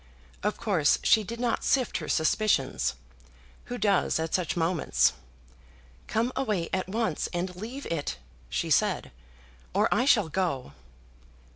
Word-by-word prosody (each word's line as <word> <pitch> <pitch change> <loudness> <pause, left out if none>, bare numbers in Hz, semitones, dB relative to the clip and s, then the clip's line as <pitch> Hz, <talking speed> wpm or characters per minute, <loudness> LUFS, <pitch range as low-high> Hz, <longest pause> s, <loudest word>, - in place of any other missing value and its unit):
Of 210 +1 -1
course, 185 -10 +2
she 220 - +5
did 230 +4 -6
not 240 -1 0
sift 255 -4 +1
her 155 - -6
suspicions. 160 - +1 0.7
Who 245 - -5
does 200 -7 +2
at 160 0 -3
such 180 -2 0
moments? 165 -1 +2 0.9
"Come 230 +3 0
away 210 -10 -1
at 185 0 -1
once, 215 -6 -1
and 180 +1 -2
leave 235 +9 -7
it," 145 - -3 0.3
she - - -2
said, - - +2 0.6
"or 210 +3 +4
I 250 - +2
shall 220 -10 +4
go." 160 - -1
190 Hz, 135 wpm, -28 LUFS, 165-225 Hz, 0.9 s, she